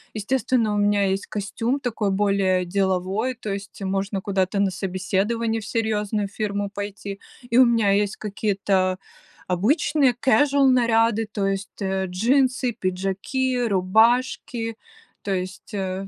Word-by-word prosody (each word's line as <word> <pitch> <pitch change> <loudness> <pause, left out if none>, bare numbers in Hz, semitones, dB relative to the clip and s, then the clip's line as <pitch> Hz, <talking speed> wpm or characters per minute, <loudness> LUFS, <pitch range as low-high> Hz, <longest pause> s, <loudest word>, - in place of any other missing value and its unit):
Естественно, 225 0 0
у - - 0
меня 205 0 +2
есть 195 +1 -1
костюм 225 +6 -2
такой 225 -5 -1
более 195 -2 +1
деловой, 190 +6 0
то 215 -3 -6
есть 195 0 -8
можно 195 +1 -1
куда-то 195 0 0
на 195 -1 +2
собеседование 205 +5 -1
в - - -9
серьезную 215 -2 -1
фирму 205 -1 -3
пойти. 205 -1 -6 0.3
И 235 - +2
у 260 - +8
меня 230 -4 +3
есть 205 +1 +1
какие-то 195 -3 0 0.5
обычные 260 - +2
кэжуал 275 +2 +3
наряды, 230 -3 +3
то 200 -2 -1
есть, 195 +1 -4
э, 190 0 -1
джинсы, 255 +6 +1
пиджаки, 195 +7 -1
рубашки. 225 +3 +1 0.5
То 200 - -3
есть, 185 +3 -5
э 190 0 -3
205 Hz, 130 wpm, -23 LUFS, 195-230 Hz, 0.5 s, у